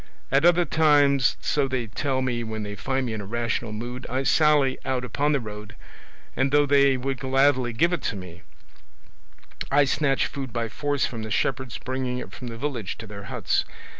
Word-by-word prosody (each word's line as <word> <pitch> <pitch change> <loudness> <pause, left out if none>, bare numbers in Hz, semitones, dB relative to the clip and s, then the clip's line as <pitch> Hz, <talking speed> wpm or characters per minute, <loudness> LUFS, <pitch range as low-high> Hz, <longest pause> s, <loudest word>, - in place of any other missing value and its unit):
At 135 +4 +4
other 175 0 +5
times, 145 -4 +4
so 145 -2 +1
they 130 -2 -2
tell 130 +4 -1
me 120 -2 -1
when 110 -1 -4
they 105 0 -5
find 130 +5 -2
me 115 - -3
in 110 - -4
a - - -7
rational 115 0 -2
mood, 120 +4 -6
I 130 +1 -1
sally 145 -3 +3
out 125 -1 -1
upon 145 +5 0
the 145 - +2
road, 105 -2 -8 0.6
and 135 +1 +1
though 145 0 +4
they 140 -1 +4
would 135 +1 -3
gladly 135 -2 +2
give 170 +10 +2
it 180 - -1
me, 90 -4 -9 1.3
I 145 +1 +4
snatch 135 -1 +1
food 135 -3 -5
by 115 -1 -2
force 145 +4 -1
from 115 -2 -5
the 110 - -5
shepherds 125 +4 -1
bringing 130 -1 -3
it - - -7
from 125 - -8
the 115 -1 -6
village 125 -7 -4
to 115 - -8
their 100 -1 -9
huts. - - 0
130 Hz, 195 wpm, -25 LUFS, 115-140 Hz, 1.3 s, other